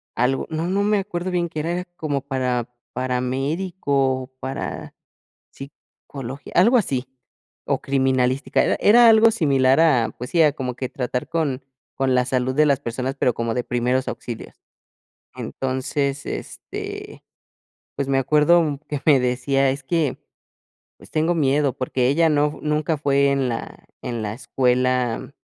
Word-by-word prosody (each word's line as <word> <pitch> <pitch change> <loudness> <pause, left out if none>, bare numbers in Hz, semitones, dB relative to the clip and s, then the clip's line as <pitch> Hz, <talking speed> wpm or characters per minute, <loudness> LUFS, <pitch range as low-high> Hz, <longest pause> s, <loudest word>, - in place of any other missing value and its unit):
algo, 125 +3 +1
no 160 +1 -2
no 195 +2 +1
me 210 0 +2
acuerdo 185 -2 -4
bien 175 -1 0
que 155 - -5
era 175 +3 -2
como 145 -3 -2
para 130 -3 -2 0.2
paramédico 135 +2 -1
o 130 - -8
para 135 +1 -5 0.6
psicología, 135 -1 -10
algo 230 +8 +5
así, 135 - 0 0.6
o - - 0
criminalística. 130 0 +1
Era - - +1
era 235 +3 +7
algo 225 0 +7
similar 135 - +3
a 130 -9 +3
pues 125 +1 -7
sí, 170 - +4
ah, 150 -2 +4
como 130 -4 -4
que 130 +1 -4
tratar 125 +1 -3
con 150 -5 -1 0.3
con 135 -1 +1
la 125 0 +3
salud 130 0 0
de 155 +2 +4
las 140 -2 +3
personas, 130 +1 -4
pero, 125 - +2
como 115 0 -2
de 125 - -1
primeros 125 +2 0
auxilios. 115 -2 -6 0.8
Entonces, 135 +2 -2
este, - - -7 0.7
pues, 140 -1 -2
me 135 -1 +2
acuerdo 150 +2 +3
que 145 -2 -4
me 145 -3 +6
decía 130 +2 +1
es 140 +2 -5
que, 150 0 -1 0.8
pues - - -16
tengo 160 +2 +1
miedo, 145 -3 +2
porque, 130 -1 -1
ella 165 +4 +3
no, 150 -1 +1
nunca 150 +1 0
fue 140 -1 +2
en 135 -2 +1
la 115 - -6 0.2
en 120 -2 -4
la 105 -1 -3
escuela, 125 -1 0
135 Hz, 150 wpm, -22 LUFS, 130-155 Hz, 0.8 s, era